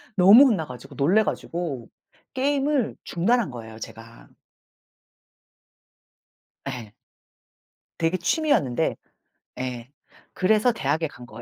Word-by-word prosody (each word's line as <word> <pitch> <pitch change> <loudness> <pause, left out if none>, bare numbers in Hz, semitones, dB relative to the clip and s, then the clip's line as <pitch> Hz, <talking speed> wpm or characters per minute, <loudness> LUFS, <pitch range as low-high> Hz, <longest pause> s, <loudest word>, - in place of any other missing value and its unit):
너무 200 +9 +8
혼나 195 -11 0
가지고 125 -3 -11
놀래 185 +10 +3
가지고 160 - -4 0.4
게임을 275 -2 0
중단한 220 +4 +1
거예요, 110 -2 -9
제가. 115 +1 -11 2.4
예. 115 -5 -8 1.0
되게 165 +2 +1
취미였는데 190 - +1 0.6
예 125 -1 -5 0.4
그래서 215 +5 +3
대학에 160 - -1
간 125 -4 -13
거예요. 120 - -11
170 Hz, 220 characters per minute, -24 LUFS, -, 2.4 s, 너무